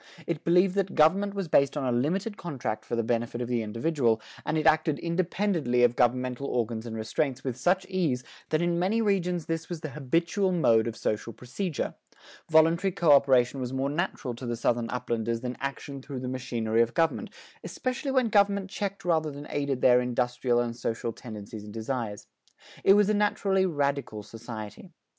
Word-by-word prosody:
It 165 -3 -3
believed 180 +2 +4
that 195 -1 0
government 195 +6 +3
was 195 -3 -2
based 140 -3 +3
on 135 - -1
a 125 -2 +1
limited 185 - 0
contract 130 - -4
for 120 - -2
the 115 - 0
benefit 120 +1 -1
of 120 - -2
the 120 -1 0
individual, 115 +1 0 0.2
and 155 - -1
it 155 - -1
acted 155 -1 +3
independently 170 -7 0
of 120 0 +4
governmental 125 +2 +1
organs 115 -2 -2
and 110 - -5
restraints 125 +5 -2
with 130 -3 -2
such 185 +8 +1
ease 165 -10 0 0.3
that 155 +2 +1
in 170 0 +1
many 195 +6 +1
regions 180 -6 0
this 165 0 -3
was 170 -3 -5
the 155 - -5
habitual 165 +7 0
mode 115 -11 +3
of 115 - -4
social 110 +2 -2
procedure: 140 - -4 0.6
voluntary 165 +4 +4
coöperation 140 -6 +4
was 125 0 -4
more 135 +1 -1
natural 150 -5 -2
to 120 +2 -7
the 120 - -1
Southern 120 0 0
Uplanders 115 -1 -2
than 125 0 -4
action 140 0 -5
through 135 -2 -6
the 130 - -4
machinery 120 -3 0
of 115 0 0
government, 165 -1 +1 0.3
especially 265 +2 -3
when 260 -3 +2
government 200 -2 +2
checked 200 -2 -4
rather 160 -3 +2
than 145 0 -8
aided 140 -3 -1
their 125 0 +6
industrial 125 0 0
and 120 -1 -1
social 115 0 -3
tendencies 105 -2 -9
and 105 0 -10
desires. 115 -2 -4 0.6
It 195 - +7
was 205 0 +5
a 215 - +2
naturally 200 -2 +2
radical 140 - -1
society. 110 - -9
140 Hz, 180 wpm, -28 LUFS, 120-175 Hz, 0.6 s, It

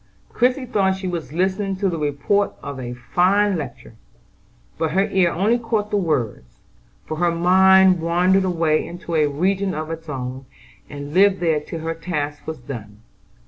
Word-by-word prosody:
Christie 255 +2 +1
thought 195 -5 +1
she 190 0 -5
was 170 -4 -4
listening 190 +4 -1
to 195 +1 -1
the 170 -3 -2
report 150 +8 0
of 140 -2 -6
a 125 -1 -5
fine 190 +11 +2
lecture; 150 -6 -7 0.9
but 160 -1 -1
her 195 +2 +3
ear 190 -3 +3
only 215 +7 +1
caught 220 -3 -2
the - - +1
words, 130 - -2 0.5
for 155 - -5
her 175 +1 +2
mind 185 +2 +5
wandered 180 +3 +2
away 165 -4 +1
into 175 0 -8
a 155 -2 +3
region 190 +6 0
of 155 +1 -4
its 165 -1 -7
own, 130 -1 -5 0.4
and 145 0 -7
lived 195 +1 +4
there 165 -3 +1
till 160 +2 -7
her 165 +1 -2
task 150 -3 -4
was 160 -1 -4
done. 110 -4 -9
170 Hz, 170 wpm, -21 LUFS, 150-190 Hz, 0.9 s, mind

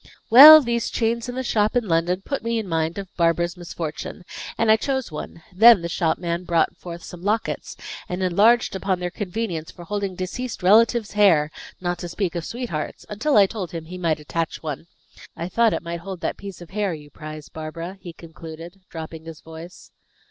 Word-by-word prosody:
"Well, 305 +6 +12
these 235 -3 -1
chains 230 +1 -1
in 245 - -5
the 260 - -2
shop 215 -2 +1
in 240 -3 +1
London 175 +2 0
put 280 - -3
me 230 0 -1
in 220 -3 -3
mind 165 0 -1
of 195 -2 -8
Barbara's 170 +1 +1
misfortune, 175 0 -6 0.3
and 225 -1 +3
I - - +7
chose 265 - -2
one. 155 +2 -8
Then 220 -1 +7
the 170 - -3
shopman 170 +1 -1
brought 170 0 +1
forth 170 -1 -9
some 180 - -10
lockets, 210 +4 -2 0.3
and 180 +1 -3
enlarged 205 +6 +3
upon 190 -1 -1
their 180 0 -3
convenience 180 -4 -4
for 175 - -11
holding 200 0 -3
deceased 200 +5 -5
relatives' 220 +3 +4
hair, 170 -8 +4 0.3
not 175 -1 -2
to 175 - -6
speak 180 0 -2
of 170 -2 -4
sweethearts', 230 - -5
until 230 +7 +1
I 200 - +8
told 190 -3 -5
him 165 -1 -5
he 180 +3 -8
might 165 -3 0
attach 155 +3 -4
one. 155 +1 -5 0.5
I 170 - -3
thought 230 +4 +3
it - - -3
might 170 0 -5
hold 185 0 -8
that - - -2
piece 195 -3 -10
of 175 - -12
hair 200 -3 -1
you 150 -1 -13
prize, 155 0 -9
Barbara," 165 +4 -7
he 175 - -8
concluded, 165 +2 -11
dropping 160 0 -8
his 165 -2 -10
voice. 165 +2 -12
180 Hz, 195 wpm, -23 LUFS, 165-215 Hz, 0.5 s, Well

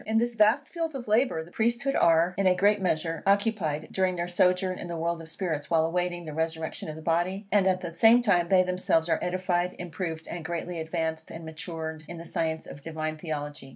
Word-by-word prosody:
In 220 +1 +1
this 240 +1 +1
vast 230 +6 +3
field 330 -3 -3
of 245 -4 -6
labour, 215 -6 +2
the 170 - -15
Priesthood 240 +6 0
are, 165 +1 +4
in 195 -1 +2
a 185 - +5
great 205 +2 +3
measure, 165 -2 -1
occupied, 200 -7 +1
during 185 -1 +1
their 175 0 -2
sojourn 180 +1 +2
in - - -6
the 170 -1 -4
world 170 +1 -1
of 160 - -10
spirits 160 -4 -3
while 160 -1 +3
awaiting 175 +1 -1
the 155 - -6
resurrection 160 0 -3
of 155 - -5
the 160 - -10
body; 175 +5 0
and 200 -2 +4
at 185 -1 +2
the 170 -2 -5
same 225 +7 +6
time 175 -6 +3
they 185 0 +5
themselves 180 -3 +1
are 160 - +2
edified, 180 0 0
improved, 165 -1 -5
and 170 -1 -5
greatly 170 +1 -4
advanced 160 0 -3
and 165 0 -8
matured 160 0 -6
in 175 - -7
the 165 - -8
science 160 -1 -2
of 145 - -10
divine 155 0 -4
Theology. 150 -3 -5
175 Hz, 220 wpm, -27 LUFS, 160-190 Hz, -, same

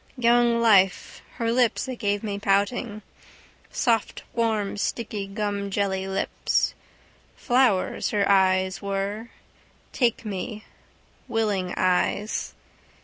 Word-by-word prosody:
Young 235 -1 +3
life, 200 -5 +3
her 230 -1 -1
lips 240 -1 +2
that 260 -2 -5
gave 205 -2 -1
me 200 -2 -3
pouting. 205 +2 0 0.7
Soft 225 -3 0
warm 220 -3 0
sticky 205 -1 -3
gumjelly 200 -1 -2
lips. 195 0 0 0.6
Flowers 245 -7 +1
her 200 -1 +1
eyes 190 -1 +3
were, 200 +3 -3 0.6
take 235 -3 0
me, 210 +2 -5 0.6
willing 210 -6 -1
eyes. 185 +3 0
205 Hz, 95 wpm, -25 LUFS, 195-230 Hz, 0.7 s, Young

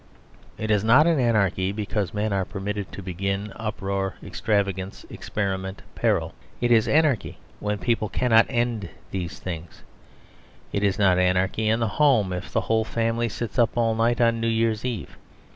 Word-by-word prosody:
It 110 0 -2
is 105 -1 +3
not 125 +8 +6
anarchy 110 - +2
because 100 -2 -2
men 105 0 -1
are 95 -1 +1
permitted 100 +1 -4
to 100 - -8
begin 100 +3 -3
uproar, 100 -3 -3
extravagance, 100 -2 -2
experiment, 95 -1 -3
peril. - - 0 0.3
It 120 0 +1
is 115 -2 +5
anarchy 150 -6 +2 0.2
when 105 0 -1
people 115 -2 0
cannot 115 -2 +4
end 120 -6 -1 0.2
these 90 -1 -4
things. 85 -2 -7 0.9
It 100 - 0
is 100 -2 +1
not 95 -3 +4
anarchy 95 +4 +1
in 115 +2 +2
the 115 - +2
home 115 -7 +3
if 90 +1 -5
the - - +1
whole 110 0 +1
family 115 +1 -1
sits 120 +3 -4
up 115 0 +2
all 115 -1 +2
night 115 +2 +1
on 115 -1 +3
New 115 - 0
Year's 115 -1 +1
Eve. 115 - -5
105 Hz, 160 wpm, -24 LUFS, 95-115 Hz, 0.9 s, not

